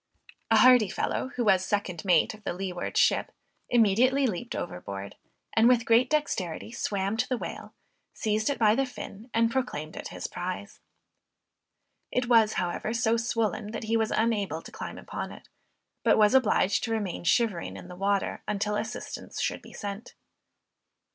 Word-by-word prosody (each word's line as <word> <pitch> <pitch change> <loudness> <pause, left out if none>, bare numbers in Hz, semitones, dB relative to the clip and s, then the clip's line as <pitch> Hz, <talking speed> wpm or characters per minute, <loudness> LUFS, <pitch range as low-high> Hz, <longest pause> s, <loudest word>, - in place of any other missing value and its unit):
A - - +5
hardy 250 -5 +7
fellow 260 - -1
who 245 - 0
was 190 -3 +4
second 195 -5 -2
mate 180 -2 +3
of 215 0 -14
the - - -2
leeward 180 -1 -4
ship - - +3 0.4
immediately 245 +5 +4
leaped 230 +1 -3
overboard 95 +2 -6 0.4
and 225 +1 +5
with 240 -2 +4
great 235 +2 +4
dexterity 220 - -1
swam 200 -2 -2
to 250 - 0
the 255 - 0
whale, - - -7 0.4
seized 215 +1 0
it 285 - -1
by 215 -2 +4
the 270 +3 +1
fin, 225 -2 -9
and 230 0 +2
proclaimed 160 - -3
it - - -6
his - - -7
prize. 185 +3 -5 1.3
It 250 -1 0
was, 225 -3 +5
however, 180 +5 -2
so 230 -1 +2
swollen, 225 -2 -1
that 225 - -4
he 225 +1 0
was 220 -1 +2
unable 205 -7 0
to - - -11
climb - - -7
upon - - -6
it, - - -13 0.6
but - - +4
was 210 +2 +5
obliged 215 -6 +3
to 225 - -4
remain 205 -7 -2
shivering 195 0 +1
in - - -10
the 180 - -9
water 195 +1 0
until 210 0 -1
assistance 220 - -6
should - - -1
be - - -14
sent. 205 +2 -7
215 Hz, 165 wpm, -28 LUFS, 195-235 Hz, 1.3 s, hardy